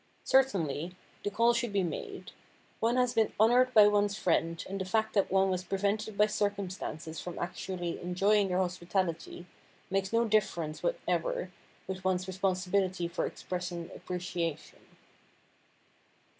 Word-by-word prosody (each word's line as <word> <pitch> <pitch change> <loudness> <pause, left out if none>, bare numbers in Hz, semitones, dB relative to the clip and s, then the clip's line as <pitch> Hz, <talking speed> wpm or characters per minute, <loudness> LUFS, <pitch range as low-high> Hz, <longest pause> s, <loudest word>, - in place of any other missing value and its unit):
Certainly, 180 - +2 0.3
the - - 0
call 230 +3 +3
should 235 -1 -1
be 200 -1 +1
made. 175 - -5 0.5
One 230 +2 +2
has 250 -1 +2
been 225 -3 +2
honored 245 +4 +5
by 210 -1 +9
one's 205 -1 +2
friends 165 -1 0
and 195 0 -4
the - - -2
fact 220 +3 0
that 200 -2 +2
one 190 0 +3
was 185 0 -1
prevented 200 +3 -1
by 210 - +6
circumstances 195 -6 -3
from 175 - -6
actually 175 -1 -4
enjoying 195 +3 +2
their 180 -1 0
hospitality 175 -1 -2 0.5
makes 195 0 0
no 230 +1 +3
difference 190 -8 0
whatever - - -1 0.3
with 185 0 -5
one's 185 -1 +1
responsibility 185 -1 0
for 170 +1 -2
expressing 175 -2 -5
appreciation. 175 -3 -4
190 Hz, 135 wpm, -31 LUFS, 180-210 Hz, 0.5 s, by